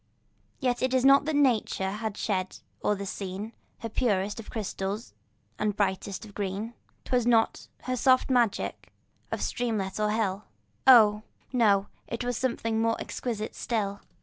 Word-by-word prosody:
Yet 250 Hz, -3 st, 0 dB
it 260 Hz, 0 st, +1 dB
was 260 Hz, 0 st, +3 dB
not 275 Hz, +1 st, +7 dB
that 310 Hz, -1 st, 0 dB
nature 230 Hz, -8 st, +2 dB
had 215 Hz, 0 st, -4 dB
shed 190 Hz, -3 st, -2 dB, 0.3 s
o'er 210 Hz, -, +2 dB
the 200 Hz, 0 st, -5 dB
scene 195 Hz, +3 st, -5 dB, 0.3 s
Her 230 Hz, -, -4 dB
purest 205 Hz, -3 st, 0 dB
of 225 Hz, -, -9 dB
crystal 200 Hz, -2 st, -3 dB, 0.6 s
and 210 Hz, -2 st, 0 dB
brightest 195 Hz, +1 st, -1 dB
of 205 Hz, -, -13 dB
green; 205 Hz, +3 st, -3 dB, 0.3 s
'Twas 245 Hz, -2 st, +1 dB
not 230 Hz, -2 st, +2 dB, 0.2 s
her 255 Hz, -, -1 dB
soft 255 Hz, +1 st, +4 dB
magic 240 Hz, -5 st, 0 dB, 0.4 s
of -, -, -2 dB
streamlet 215 Hz, -5 st, -2 dB
or 210 Hz, 0 st, +2 dB
hill, 210 Hz, -2 st, -1 dB, 0.4 s
Oh! 215 Hz, -5 st, +8 dB, 0.3 s
no—it 225 Hz, +1 st, +1 dB
was 245 Hz, 0 st, -1 dB
something 230 Hz, -3 st, -1 dB
more 225 Hz, 0 st, +1 dB
exquisite 220 Hz, -3 st, -4 dB
still. 205 Hz, -4 st, -2 dB
220 Hz, 150 wpm, -28 LUFS, 200-245 Hz, 0.6 s, Oh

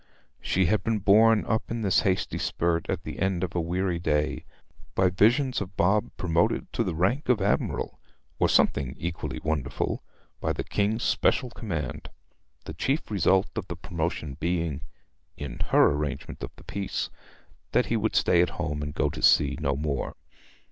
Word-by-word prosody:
She 95 Hz, 0 st, +1 dB
had 105 Hz, +5 st, +1 dB
been 115 Hz, -1 st, +1 dB
borne 105 Hz, +2 st, +5 dB
up 110 Hz, 0 st, -1 dB
in 115 Hz, -1 st, -3 dB
this 95 Hz, -3 st, +4 dB
hasty 95 Hz, -3 st, 0 dB
spurt 85 Hz, 0 st, 0 dB
at -, -, -2 dB
the -, -, -7 dB
end 95 Hz, -1 st, 0 dB
of 90 Hz, -, -3 dB
a 85 Hz, -, 0 dB
weary 90 Hz, +1 st, -1 dB
day 75 Hz, -3 st, 0 dB, 0.5 s
by 95 Hz, -1 st, +3 dB
visions 120 Hz, +8 st, +3 dB
of 95 Hz, 0 st, -7 dB
Bob 100 Hz, +4 st, +2 dB
promoted 85 Hz, -2 st, 0 dB
to -, -, +1 dB
the -, -, -2 dB
rank 120 Hz, -, 0 dB
of 125 Hz, -4 st, +4 dB
admiral, 100 Hz, +1 st, -1 dB, 0.4 s
or -, -, +3 dB
something 70 Hz, -1 st, +2 dB
equally 85 Hz, +3 st, -4 dB
wonderful, 80 Hz, -4 st, -1 dB, 0.4 s
by -, -, 0 dB
the -, -, -3 dB
King's 105 Hz, +3 st, 0 dB
special 125 Hz, -3 st, +2 dB
command, 80 Hz, -, -5 dB, 0.6 s
the -, -, -6 dB
chief 140 Hz, -2 st, -1 dB
result 95 Hz, 0 st, +3 dB
of 105 Hz, -5 st, -4 dB
the 85 Hz, -, -5 dB
promotion 85 Hz, -5 st, -3 dB
being, 85 Hz, -4 st, -1 dB, 0.6 s
in 70 Hz, -4 st, -6 dB
her -, -, +5 dB
arrangement 75 Hz, 0 st, -4 dB
of -, -, -4 dB
the -, -, -16 dB
piece, 100 Hz, -1 st, -3 dB, 0.6 s
that -, -, +3 dB
he 115 Hz, -, -1 dB
would 110 Hz, 0 st, 0 dB
stay 85 Hz, -, +4 dB
at 90 Hz, -, +2 dB
home 75 Hz, -4 st, -2 dB
and 75 Hz, 0 st, -5 dB
go -, -, +2 dB
to -, -, -5 dB
sea -, -, +5 dB
no 70 Hz, +1 st, +1 dB
more. 70 Hz, -1 st, -2 dB
90 Hz, 175 wpm, -27 LUFS, 80-105 Hz, 0.6 s, borne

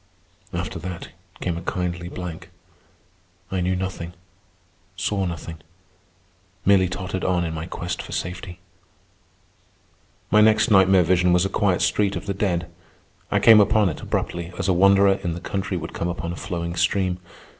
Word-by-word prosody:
After 85 Hz, -3 st, -4 dB
that 90 Hz, 0 st, -6 dB, 0.3 s
came 85 Hz, -2 st, -2 dB
a -, -, -5 dB
kindly 85 Hz, -1 st, -3 dB
blank. 90 Hz, -3 st, -7 dB, 1.0 s
I 95 Hz, -1 st, -1 dB
knew 90 Hz, +1 st, +1 dB
nothing, 90 Hz, -2 st, -4 dB, 0.8 s
saw 95 Hz, +1 st, -1 dB
nothing, 85 Hz, -1 st, -6 dB, 1.1 s
merely 95 Hz, -2 st, +5 dB
tottered 95 Hz, 0 st, -4 dB
on 90 Hz, -2 st, +1 dB
in 80 Hz, -, -3 dB
my 80 Hz, +1 st, -5 dB
quest 90 Hz, -1 st, -4 dB
for -, -, -11 dB
safety. 90 Hz, 0 st, -5 dB, 1.7 s
My 105 Hz, -, +6 dB
next 110 Hz, +2 st, +4 dB
nightmare 95 Hz, -2 st, +6 dB
vision 90 Hz, +1 st, +3 dB
was 90 Hz, +1 st, +3 dB
a -, -, -1 dB
quiet 95 Hz, -3 st, +1 dB
street 100 Hz, -1 st, +1 dB
of 85 Hz, -, -5 dB
the 100 Hz, -, -2 dB
dead. 90 Hz, -4 st, -1 dB, 0.6 s
I -, -, +2 dB
came 110 Hz, -2 st, +8 dB
upon 105 Hz, -1 st, +4 dB
it 75 Hz, -, -6 dB
abruptly, 85 Hz, 0 st, -3 dB
as 95 Hz, -, -2 dB
a 95 Hz, -, +3 dB
wanderer 100 Hz, +2 st, +5 dB
in 85 Hz, -, -1 dB
the -, -, -6 dB
country 95 Hz, +1 st, -3 dB
would 85 Hz, -, -6 dB
come 85 Hz, -, -2 dB
upon 85 Hz, 0 st, -4 dB
a -, -, -6 dB
flowing 85 Hz, -2 st, -4 dB
stream. 90 Hz, +1 st, +1 dB
90 Hz, 160 wpm, -23 LUFS, 85-95 Hz, 1.7 s, came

